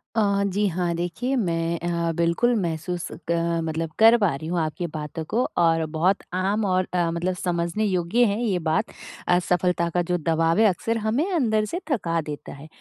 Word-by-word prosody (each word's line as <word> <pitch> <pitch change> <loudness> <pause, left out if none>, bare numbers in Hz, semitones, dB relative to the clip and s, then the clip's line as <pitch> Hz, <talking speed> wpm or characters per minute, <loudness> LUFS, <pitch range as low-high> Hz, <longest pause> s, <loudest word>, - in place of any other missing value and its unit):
अ, 200 -2 +2
जी, 200 +2 0
हाँ। 175 -1 -1
देखिए, 175 +10 -2
मैं 170 -6 0
अ, 170 -1 -1
बिल्कुल 170 +9 +2
महसूस 170 +1 -3 0.2
क 170 0 +1
मतलब 160 0 -3
कर 225 +2 +8
पा 200 -9 +2
रही 155 +3 -7
हूँ 175 +1 -1
आपकी 160 +3 -3
बातों 150 +1 -5
को 240 +9 0
और 165 -1 +3
बहुत 180 +5 +1
आम 200 +3 0
और 185 -1 +1
अ, 175 -2 +1
मतलब 175 +2 -1
समझने 175 +3 -1
योग्य 185 +5 +2
है 210 +2 0
ये 195 -6 +1
बात, 175 +7 0 0.4
असफलता 180 -1 +1
का 175 +1 0
जो 180 - +2
दबाव 165 +2 +1
है 225 - +6
अक्सर 225 +5 -1
हमें 290 - 0
अंदर 220 -10 +1
से 345 +10 -4
थका 170 -9 0
देता 150 -1 -7
है। 140 +3 -11
175 Hz, 185 wpm, -24 LUFS, 165-205 Hz, 0.4 s, कर